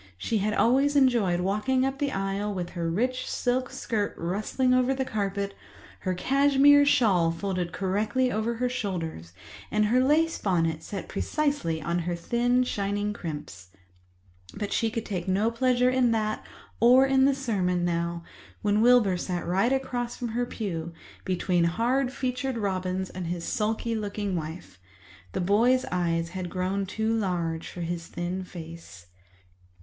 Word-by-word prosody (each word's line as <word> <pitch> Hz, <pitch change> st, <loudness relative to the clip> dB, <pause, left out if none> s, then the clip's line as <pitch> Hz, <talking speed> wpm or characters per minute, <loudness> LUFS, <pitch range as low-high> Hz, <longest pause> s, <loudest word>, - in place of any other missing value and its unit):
She 215 Hz, -, -1 dB
had 210 Hz, +1 st, 0 dB
always 275 Hz, +5 st, +3 dB
enjoyed 235 Hz, -10 st, +3 dB
walking 215 Hz, +8 st, +1 dB
up 270 Hz, 0 st, -2 dB
the 285 Hz, -1 st, 0 dB
aisle 195 Hz, 0 st, -2 dB
with 175 Hz, -2 st, -4 dB
her 170 Hz, -2 st, -2 dB
rich 250 Hz, +8 st, -1 dB
silk 255 Hz, +1 st, 0 dB
skirt 225 Hz, -5 st, -2 dB
rustling 215 Hz, +9 st, 0 dB
over 255 Hz, +1 st, +3 dB
the 265 Hz, 0 st, -1 dB
carpet, 200 Hz, -3 st, -2 dB, 0.5 s
her 185 Hz, -1 st, -2 dB
cashmere 280 Hz, +5 st, +5 dB
shawl 195 Hz, -12 st, +4 dB
folded 175 Hz, +1 st, -2 dB
correctly 210 Hz, +8 st, 0 dB
over 220 Hz, +2 st, -1 dB
her 250 Hz, +2 st, 0 dB
shoulders, 175 Hz, -, -4 dB, 0.4 s
and 215 Hz, 0 st, +2 dB
her 240 Hz, +4 st, +3 dB
lace 320 Hz, +4 st, +2 dB
bonnet 165 Hz, -5 st, 0 dB
set 195 Hz, +3 st, -6 dB
precisely 285 Hz, -, -1 dB
on 170 Hz, +2 st, 0 dB
her 175 Hz, 0 st, -2 dB
thin 240 Hz, +7 st, +1 dB
shining 205 Hz, -2 st, -2 dB
crimps. 150 Hz, -, -7 dB, 0.9 s
But 205 Hz, -, -3 dB
she 225 Hz, -, +1 dB
could 225 Hz, 0 st, -4 dB
take 185 Hz, -3 st, -4 dB
no 200 Hz, +5 st, +2 dB
pleasure 250 Hz, +1 st, +2 dB
in 255 Hz, -2 st, +3 dB
that 215 Hz, -1 st, -1 dB, 0.4 s
or 250 Hz, +4 st, +6 dB
in 265 Hz, 0 st, +4 dB
the 275 Hz, 0 st, +3 dB
sermon 185 Hz, -9 st, 0 dB
now, 170 Hz, 0 st, -1 dB, 0.4 s
when 210 Hz, 0 st, +2 dB
Wilbur 230 Hz, -6 st, +5 dB
sat 175 Hz, -1 st, -3 dB
right 190 Hz, +8 st, +2 dB
across 250 Hz, -3 st, -2 dB
from 240 Hz, -, -4 dB
her 240 Hz, +2 st, -1 dB
pew, 170 Hz, -8 st, -4 dB, 0.3 s
between 180 Hz, -1 st, +1 dB
hard 245 Hz, +9 st, +1 dB
featured 260 Hz, -1 st, -2 dB
Robins 190 Hz, -2 st, -2 dB
and 185 Hz, -2 st, -5 dB
his 170 Hz, 0 st, -3 dB
sulky 225 Hz, +1 st, -1 dB
looking 205 Hz, -2 st, -2 dB
wife. 160 Hz, -, -6 dB, 0.5 s
The -, -, -1 dB
boy's 235 Hz, +8 st, +3 dB
eyes 170 Hz, -2 st, 0 dB
had 180 Hz, 0 st, -5 dB
grown 190 Hz, +2 st, -2 dB
too 220 Hz, +3 st, -1 dB
large 170 Hz, -6 st, -2 dB
for 175 Hz, -, -8 dB
his 170 Hz, 0 st, -4 dB
thin 180 Hz, +2 st, -4 dB
face. 165 Hz, -, -10 dB
205 Hz, 155 wpm, -27 LUFS, 175-250 Hz, 0.9 s, or